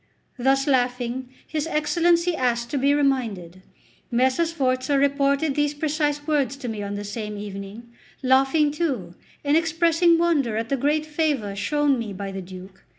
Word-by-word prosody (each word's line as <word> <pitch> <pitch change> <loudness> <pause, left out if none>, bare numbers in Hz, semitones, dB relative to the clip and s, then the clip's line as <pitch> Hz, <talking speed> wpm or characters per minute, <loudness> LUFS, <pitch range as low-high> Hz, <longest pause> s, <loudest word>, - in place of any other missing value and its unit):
Thus 270 +2 +2
laughing, 250 -1 0 0.2
his 310 0 -2
Excellency 340 +2 +2
asked 235 -3 -1
to 280 - 0
be 280 +2 +3
reminded. 225 -11 -1 0.5
Messer 260 +6 +2
Sforza 265 -3 0
reported 280 +1 +2
these 295 +1 0
precise 295 -1 -1
words 285 -4 0
to 260 - -6
me 220 -3 -4
on 200 0 -4
the 205 - -4
same 210 0 -5
evening, 205 +3 -8 0.3
laughing 270 +3 +3
too 300 -3 -2 0.3
and 285 +1 +3
expressing 335 +1 +3
wonder 295 -10 +1
at 225 0 -3
the 275 - +1
great 295 +4 0
favour 295 -10 -1
shown 290 +5 +1
me 215 -3 -4
by 195 +1 -5
the 195 0 -5
Duke. 185 +1 -12
270 Hz, 155 wpm, -24 LUFS, 230-300 Hz, 0.5 s, be